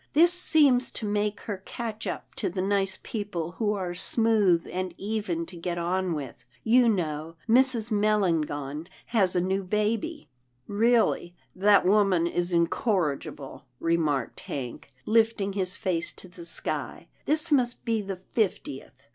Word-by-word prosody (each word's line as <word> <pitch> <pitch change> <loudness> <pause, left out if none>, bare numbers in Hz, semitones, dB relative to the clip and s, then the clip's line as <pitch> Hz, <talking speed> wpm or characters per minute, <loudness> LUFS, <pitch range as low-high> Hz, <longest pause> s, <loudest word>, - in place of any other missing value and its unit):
This 340 +4 +6
seems 290 -8 +4
to 220 - -3
make 205 0 -1
her 200 -3 -5
catch 225 -1 -5
up - - -5
to 195 - -1
the 185 +2 -5
nice 195 -1 0
people 200 -7 -4
who 210 -2 +1
are 185 -3 -3
smooth 205 -2 +2
and 185 -1 -3
even 200 -5 -2
to 180 - -11
get 170 +1 -3
on 180 +1 0
with 135 -5 -6
— - - -37
You 250 -2 +6
know 160 -5 -2
Mrs. 240 -1 +3
Melangon 165 -8 0 0.2
has 200 -6 +2
a - - +4
new 190 +2 0
baby 220 - -1
— 125 - -44
" 125 0 -44
" 125 - -43
Really 215 -5 +2 0.2
that 200 +1 +5
woman 195 -3 +4
is 175 +1 -1
incorrigible," 170 - -1
remarked 155 -6 0
Hank, 130 0 -6
lifting 220 -3 +2
his 185 -2 -1
face 180 -5 -1
to - - -9
the 175 -1 -11
sky, 170 - -4
" - - -37
this 305 +1 +2
must 250 -4 +1
be 225 -2 +1
the 195 -1 -4
fiftieth." 180 - -3
195 Hz, 160 wpm, -27 LUFS, 170-220 Hz, 0.2 s, This